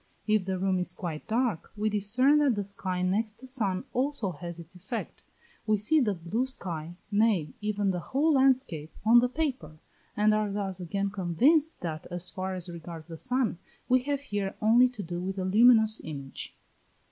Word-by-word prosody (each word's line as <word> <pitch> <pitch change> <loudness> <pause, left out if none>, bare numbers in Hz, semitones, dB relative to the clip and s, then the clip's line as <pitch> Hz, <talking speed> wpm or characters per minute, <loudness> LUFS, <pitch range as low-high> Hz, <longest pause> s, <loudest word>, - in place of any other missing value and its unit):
If 215 -3 +2
the 190 0 -1
room 190 0 +1
is 180 0 -2
quite 165 -5 -5
dark, 230 -5 -1
we 215 +1 0
discern 230 +8 +3
that 280 -5 +3
the 205 - -2
sky 185 -2 -3
next 210 +4 0
the 260 - -12
sun 215 -8 -1
also 255 -6 0
has 170 +2 -6
its 170 +2 -12
effect: 180 +2 -6 0.5
we 215 0 +3
see 230 +10 +3
the 215 -8 +1
blue 195 +10 -2
sky, 170 -9 -5 0.2
nay, 205 -7 +2
even 205 -2 0
the 180 - -2
whole 290 - +1
landscape, 260 - +2
on 235 +2 +7
the 245 +1 +2
paper, 255 - -3 0.4
and 210 +1 +4
are 215 -1 0
thus 195 -2 -3
again 195 +3 -2
convinced 250 - +2
that 160 -2 -5
as 175 0 -2
far 190 0 -3
as 180 -1 -2
regards 170 -1 -9
the 165 - -6
sun, 250 -4 0 0.3
we 255 0 +4
have 280 +1 -2
here 205 -7 -3
only 235 +4 +5
to 230 -5 -7
do 175 0 -5
with 190 +2 -4
a 185 - -2
luminous 220 +2 +5
image. 140 -3 -7
205 Hz, 185 wpm, -28 LUFS, 180-245 Hz, 0.5 s, on